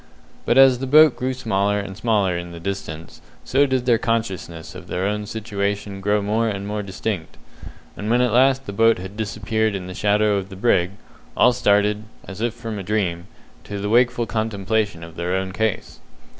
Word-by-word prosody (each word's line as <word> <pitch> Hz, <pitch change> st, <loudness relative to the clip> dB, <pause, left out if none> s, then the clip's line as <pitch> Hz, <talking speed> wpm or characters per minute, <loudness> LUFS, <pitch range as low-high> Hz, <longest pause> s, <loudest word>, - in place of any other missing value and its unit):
But -, -, +3 dB
as 135 Hz, -2 st, +7 dB
the 135 Hz, -, -3 dB
boat 155 Hz, +1 st, +7 dB
grew 130 Hz, +1 st, -2 dB
smaller 105 Hz, -5 st, 0 dB
and 100 Hz, -1 st, -6 dB
smaller 100 Hz, -4 st, +1 dB
in 85 Hz, 0 st, -5 dB
the 85 Hz, -, -8 dB
distance, 85 Hz, -3 st, -6 dB, 0.2 s
so 140 Hz, +2 st, +2 dB
did 130 Hz, -2 st, 0 dB
their 120 Hz, -3 st, +3 dB
consciousness 95 Hz, -8 st, -3 dB
of 90 Hz, -1 st, -10 dB
their 90 Hz, +2 st, -2 dB
own 105 Hz, +1 st, -2 dB
situation 100 Hz, -2 st, -3 dB
grow 105 Hz, +1 st, +1 dB
more 110 Hz, +3 st, +1 dB
and 100 Hz, -1 st, -4 dB
more 105 Hz, +1 st, -3 dB
distinct; 95 Hz, -3 st, -4 dB, 0.6 s
and 105 Hz, -, -5 dB
when 120 Hz, +2 st, +3 dB
at 125 Hz, -3 st, +2 dB
last 135 Hz, +2 st, +4 dB
the 100 Hz, -, -6 dB
boat 115 Hz, +2 st, +4 dB
had 95 Hz, +2 st, -8 dB
disappeared 110 Hz, 0 st, -1 dB
in 95 Hz, -2 st, -5 dB
the 95 Hz, -, -7 dB
shadow 105 Hz, +1 st, +2 dB
of 95 Hz, 0 st, -4 dB
the 95 Hz, -, -9 dB
brig, 95 Hz, -3 st, +2 dB, 0.4 s
all 125 Hz, -, +5 dB
started, 105 Hz, -2 st, +2 dB, 0.2 s
as 100 Hz, +1 st, -8 dB
if 120 Hz, 0 st, -1 dB
from 115 Hz, -3 st, -6 dB
a -, -, -5 dB
dream, 90 Hz, -4 st, -1 dB, 0.4 s
to 100 Hz, -, -6 dB
the 105 Hz, +1 st, -3 dB
wakeful 120 Hz, +1 st, +3 dB
contemplation 105 Hz, -4 st, -1 dB
of 85 Hz, -1 st, -11 dB
their 90 Hz, +2 st, -1 dB
own 95 Hz, 0 st, -2 dB
case. 110 Hz, +1 st, -2 dB
105 Hz, 195 wpm, -22 LUFS, 95-115 Hz, 0.6 s, as